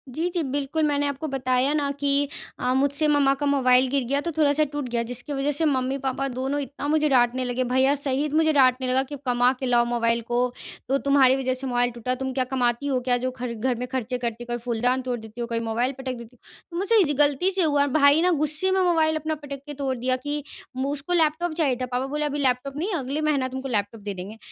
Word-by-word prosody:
जी, 330 +3 0
जी, 340 - +1
बिल्कुल 285 +3 -1
मैंने 285 0 +1
आपको 285 +2 -4
बताया 260 0 0
ना 290 -2 0
कि 285 0 +2 0.3
अ, 250 +1 +1
मुझसे 285 +3 +1
मम्मा 285 -2 +4
का 290 - -3
मोबाइल 260 -2 +4
गिर 275 -1 0
गया, 280 +3 0
तो 335 +2 -3
थोड़ा-सा 300 -1 +2
टूट 290 -4 -4
गया, 235 0 0
जिसके 245 +4 -6
वज़ह 275 +1 0
से 320 +3 0
मम्मी-पापा 270 -1 -1
दोनों 265 +2 -2
इतना 280 +1 -6
मुझे 305 0 +2
डाँटने 255 -1 +3
लगे, 250 +1 -1
भईया 260 +3 +2
सहित 285 +1 -2
मुझे 315 0 +3
डाँटने 255 -2 +3
लगा, 260 +1 +2
कि 285 +2 -8
कमा 245 0 +3
के 265 - -3
लाओ 240 -1 +3
मोबाइल 235 -1 0
को, 240 +1 -3 0.5
तो 275 - +3
तुम्हारी 270 -2 +5
वज़ह 260 -1 -1
से 265 +1 -5
मोबाइल 245 0 +1
टूटा, 240 +2 -3
तुम 265 0 -3
क्या 255 0 +1
कमाती 250 +1 0
हो 260 -2 +1
क्या 245 -1 +3
जो 255 +1 -2
खर 250 -2 -5
घर 245 +3 -1
में 250 - -3
खर्चे 250 -1 -3
करती 235 -1 -4
हो? 240 0 -5
कभी 240 - -4
फूलदान 245 +2 0
तोड़ 250 -2 -3
देती 220 +2 -9
हो, 235 - -2
कभी 230 -1 -2
मोबाइल 235 +4 0
पटक 260 -1 -4
देती 235 +1 -12 0.4
हो। - - -3
मुझे 400 +5 +1
इस 295 -5 +2
गलती 295 +6 +3
से 380 -1 +1
हुआ, 285 -2 +2
भाई 285 +2 +4
ना 360 +1 +3
गुस्से 305 +4 0
में 380 0 +2
मोबाइल 320 -3 +3
अपना 315 0 -2
पटक 280 -1 -7
के 295 - -7
तोड़ 270 -2 -2
दिया 255 +2 0
कि 290 0 -2 0.3
मु 265 +2 -1
उसको 290 +6 -3
लैपटॉप 330 +1 +1
चाहिए 300 -6 +1
था, - - 0
पापा 250 +1 -2
बोले 300 +2 -2
अभी 290 0 -2
लैपटॉप 270 0 0
नहीं 370 +6 -2
अगले 280 -1 -2
महीना 290 -4 +1
तुमको 265 +1 -5
लैपटॉप 215 -2 -2
दे 205 0 -4
देंगे। 195 +4 -8
270 Hz, 240 wpm, -24 LUFS, 250-290 Hz, 0.5 s, तुम्हारी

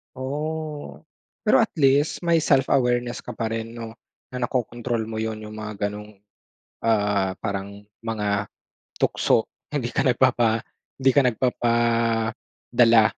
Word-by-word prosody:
Oh, 150 - -4 0.4
pero - - +5
at - - -3
least 140 +2 +3
may 165 -2 +3
self-awareness 125 -3 +2
ka - - -6
pa 115 -1 -3
rin 115 0 -4
'no, 115 -1 -8 0.4
na 125 -1 -3
nakokontrol 120 -2 -2
mo 110 - -6
yun, 110 0 -2
yung 110 0 -9
mga 105 -1 -3
gano'ng, 105 +1 -8 0.8
ah, 105 -4 +2
parang 100 -1 -4 0.2
mga 105 -2 -1 0.5
tukso. - - +2 0.2
Hindi 130 -5 -2
ka - - +2
nagpapa 120 -2 +3 0.4
hindi 135 0 +4
ka 145 - +7
nagpapadala. 115 -1 +2
115 Hz, 125 wpm, -24 LUFS, 110-130 Hz, 0.8 s, ka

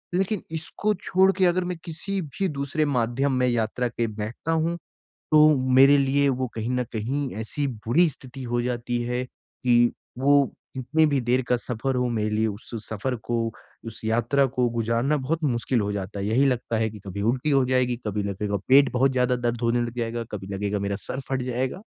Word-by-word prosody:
लेकिन 195 +2 0
इसको 165 +6 -2
छोड़ 190 +1 +4
के 190 - +4
अगर 180 +1 +2
मैं 180 -1 -3
किसी 185 +4 -3
भी 160 +6 -3
दूसरे 145 +1 -1
माध्यम 130 0 0
में 125 - +3
यात्रा 120 +1 0
के 115 +1 -1
बैठता 110 +8 -4
हूँ 165 +1 +1 0.6
तो 155 0 +7 0.3
मेरे 135 +2 +7
लिए 140 +1 +2
वो 130 - 0
कहीं 110 +1 -3
न 125 0 +1
कहीं 130 +5 -2
ऐसी 140 +6 -2 0.2
बुरी 170 +9 +5
स्थिति 130 -1 -10
हो 120 - +1
जाती 120 0 -2
है 125 +1 -1
कि 120 -1 +1 0.3
वो 140 0 +4 0.2
जितनी 140 +5 +2
भी 140 -2 +1
देर 125 +2 +2
का 125 - +3
सफ़र 125 +2 -3
हो 125 -1 +1
मेरे 110 -2 -1
लिए 110 +1 +1
उस 105 +1 -7 0.2
सफ़र 110 +4 -2
को 120 -1 -1 0.5
उस 115 - -8
यात्रा 120 +5 +2
को 125 -1 0
गुज़ारना 115 +5 0
बहुत 155 +5 -2
मुश्किल 125 -2 +1
हो 105 - -1
जाता 100 0 -4
है। 100 - -2
यही 125 +6 +3
लगता 120 -3 0
है 110 0 +1
कि 105 0 -11
कभी 100 +1 -5
उल्टी 125 +7 0
हो 135 -2 +4
जाएगी, 125 -1 +1
कभी 105 -1 -1
लगेगा 100 +1 -2
पेट 140 +2 +6
बहुत 130 +2 +3
ज़्यादा 125 -1 +2
दर्द 120 -1 -2
होने 120 0 +2
लग 120 0 -4
जाएगा, 115 0 -2
कभी 95 -2 -6
लगेगा 100 +1 -2
मेरा 100 0 -2
सर 130 - -5
फट 135 -1 0
जाएगा। 130 +8 -2
125 Hz, 200 wpm, -25 LUFS, 115-140 Hz, 0.6 s, तो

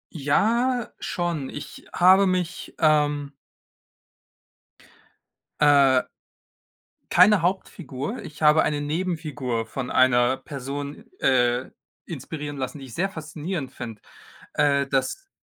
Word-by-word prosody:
Ja, 235 - +1
schon. 170 -6 -3
Ich 145 - -9
habe 190 +2 +5
mich, 180 -1 -2
ähm 145 -2 +2 2.3
Äh 140 -3 +5 1.1
Keine 185 +1 +6
Hauptfigur. 175 - -3
Ich 150 +1 -11
habe 150 +1 +5
eine 145 -1 -1
Nebenfigur 150 -7 -2
von 125 +3 -5
einer 130 0 +4
Person, 140 0 -7
äh, 125 -1 +2 0.4
inspirieren 145 -2 -6
lassen, 130 +2 -4
die 135 - -9
ich 120 - -12
sehr 195 +3 0
faszinierend 155 -2 -5
finde. 115 -3 -8 0.5
Äh, 140 -2 +2
das 135 - -2
145 Hz, 100 wpm, -24 LUFS, 135-175 Hz, 2.3 s, Keine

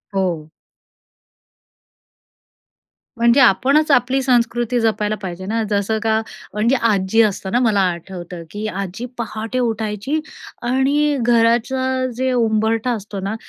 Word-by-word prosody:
हो. 170 -5 -1 2.7
म्हणजे 235 +3 +4
आपणच 275 +7 +4
आपली 260 +1 +3
संस्कृती 240 -1 +1
जपायला 215 -1 0
पाहिजे 185 -1 -6
ना. 225 +3 -1
जसं 205 +1 0
का 220 -1 +2 0.3
म्हणजे 220 +5 +2
आजी 220 -3 +2
असताना 205 +1 0
मला 220 -5 +2
आठवतं, 175 0 -7
की 210 +1 -5
आजी 195 +3 -5
पहाटे 225 +1 -4
उठायची 225 +4 -1 0.4
आणि 275 +4 +1
घराचं 245 +3 +1
जे 260 0 0
उंबरठा 225 0 +1
असतो 210 -3 -5
ना, 195 +3 -3
225 Hz, 110 wpm, -19 LUFS, 205-250 Hz, 2.7 s, म्हणजे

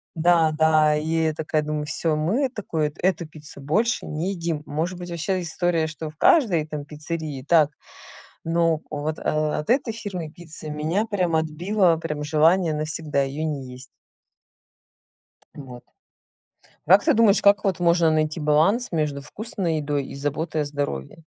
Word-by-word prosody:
Да 165 -1 +4
да 155 -1 +4
и 160 +1 0
я 155 - 0
такая 155 0 -1
думаю: 150 0 -3
"Всё, 160 0 -1
мы, 185 - +1
э, - - -16
такую 160 - -2
эту 180 -2 0
пиццу 150 -2 -12
больше 215 - 0
не 160 +6 -2
едим". 165 -5 -3
Может 165 +5 -3
быть 175 - -7
вообще 180 +3 -1
история, 170 -1 0
что 155 0 -6
в 155 - -30
каждой 195 - +4
там 150 -2 -6
пиццерии 150 -2 -5
так, 160 -4 +5 0.8
но 165 -1 +1
вот, 155 +1 -3
э, - - -9
от 155 +2 -1
этой 250 -2 +2
фирмы 190 -8 -5
пиццы 160 -1 -10
меня 160 +8 -1
прям 185 -6 -1
отбило 170 +3 +1
прям 150 -2 -4
желание 160 +2 +3
навсегда 155 -1 -1
её 140 +3 -3
не 140 -5 -4
есть. 125 +1 -10 1.7
Вот. 130 -4 -10 1.0
А 160 - -1
как 195 +2 +7
ты - - +4
думаешь, 215 -2 +4
как 205 +1 +5
вот 190 -3 0
можно 170 -1 +3
найти 155 +1 0
баланс 160 +11 +2
между 150 -4 -1
вкусной 180 +1 -3
едой 145 -2 -2
и - - -9
заботой 150 +3 -2
о - - -1
здоровье? 145 - -4
160 Hz, 165 wpm, -23 LUFS, 150-175 Hz, 1.7 s, как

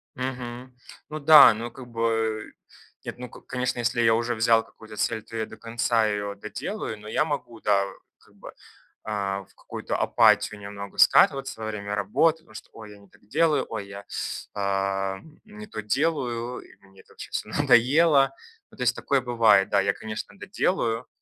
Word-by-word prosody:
Мгм. 125 -1 -6 0.4
Ну 155 0 -5
да, 155 -4 +9
ну, 115 +2 -6
как 125 +1 -11
бы 115 -2 -1 0.5
нет, - - -6
ну, 125 0 -8
ко - - -14
конечно, 125 -1 -3
если 120 0 0
я 115 -1 +4
уже 120 +1 0
взял 115 0 +3
какую-то 110 -1 -14
цель, 110 0 -1
то 115 - -12
я 110 - -1
до 110 - -13
конца 115 0 0
её 100 -1 -2
доделаю, 110 - -6
но 105 - -12
я 110 - +1
могу, 125 -7 -5
да, 100 -1 +2 0.4
как - - -25
бы, - - -12 0.5
а, 100 -2 -3
в - - -28
какую-то - - -6
апатию 105 - +3
немного 100 0 -9
скатываться 135 -4 +4
во 110 - -4
время 105 -1 -4
работы, 105 +11 +2
потому 115 -9 -21
что: 110 - -11
"Ой, 110 -2 -11
я 105 - -14
не 100 - -19
так 95 - -25
делаю". 155 +5 +2
"Ой, 105 -3 -5
я, 100 0 -10 0.5
а, 95 -1 -1 0.3
не 215 0 -11
то 205 - -6
делаю". 125 -1 -1
И - - -16
мне 95 0 -21
это - - -23
вообще - - -10
всё - - -4
надоело. 135 +2 +4 0.3
Ну, - - -19
то - - -9
есть 125 0 +2
такое 140 -1 0
бывает, 115 -5 +4
да, 100 - +3
я, 100 0 +1
конечно, 110 +1 -7
доделаю, 115 0 -1
115 Hz, 185 wpm, -25 LUFS, 105-125 Hz, 0.5 s, да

